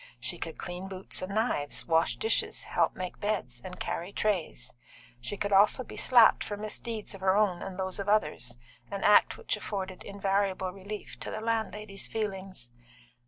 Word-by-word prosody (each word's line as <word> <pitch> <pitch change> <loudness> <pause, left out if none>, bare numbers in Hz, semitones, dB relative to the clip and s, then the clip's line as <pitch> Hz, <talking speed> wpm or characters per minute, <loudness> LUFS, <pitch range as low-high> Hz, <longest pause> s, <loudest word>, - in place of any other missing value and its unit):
She - - -1
could - - -5
clean 180 +1 -5
boots 190 -1 -4
and 190 +2 -4
knives, 215 -11 0
wash 165 0 +3
dishes, 445 - 0
help - - +1
make 185 -1 -5
beds, 185 - -1
and 185 - -8
carry 175 +3 -3
trays; 175 - -1 0.5
she 125 +12 -4
could 200 +1 -1
also 205 +6 +5
be - - -10
slapped 240 -3 +6
for 205 - -4
misdeeds 215 +1 -4
of 195 - -10
her 190 +1 +4
own 195 -5 +2
and 190 -1 -6
those 190 0 -2
of 200 0 -2
others, 150 - +1 0.3
an 200 -1 -4
act 210 - +6
which 470 - -1
afforded 190 -2 -4
invariable 195 -1 0
relief 200 +2 -7
to - - -5
the - - -4
landlady's 215 -3 -2
feelings. 195 - -4
195 Hz, 170 wpm, -30 LUFS, 185-210 Hz, 0.5 s, slapped